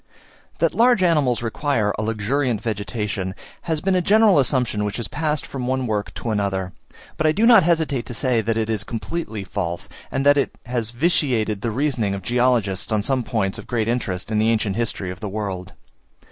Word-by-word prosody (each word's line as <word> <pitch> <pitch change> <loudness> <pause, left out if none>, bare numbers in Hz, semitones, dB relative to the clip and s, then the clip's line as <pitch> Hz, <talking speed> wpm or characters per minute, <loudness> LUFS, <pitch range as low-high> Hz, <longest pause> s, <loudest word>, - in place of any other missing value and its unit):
That - - +1
large 235 -3 +4
animals 145 -9 +2
require 115 -2 0
a - - -3
luxuriant 115 +3 0
vegetation, 100 -3 -3 0.3
has 160 -2 0
been 190 0 +1
a 180 - +3
general 210 -2 +5
assumption 125 -5 +1
which 105 +1 -2
has 115 -3 -3
passed 150 -1 -2
from 130 -3 -5
one 130 0 0
work 105 -3 -2
to 115 - -3
another; 95 -3 -1 0.4
but 155 - +2
I - - +5
do 210 +8 +2
not 235 -1 +8
hesitate 160 -7 +1
to 120 - -5
say 125 -2 +1
that 110 +1 -1
it 110 -1 0
is 110 -3 -1
completely 115 -1 -4
false, 90 -3 -4 0.2
and 135 - -2
that 145 0 +6
it 140 - 0
has 120 -2 -2
vitiated 120 - +1
the 115 - -1
reasoning 120 -5 0
of 95 - -7
geologists 120 -4 +1
on 105 -2 +1
some 130 +2 +1
points 110 -5 -1
of - - -10
great 115 -3 -1
interest 110 -5 -2
in 105 - +2
the 110 +1 +3
ancient 110 -3 +1
history 105 -5 -2
of 90 - -9
the 105 - -4
world. 95 -3 -4
115 Hz, 200 wpm, -22 LUFS, 105-140 Hz, 0.4 s, not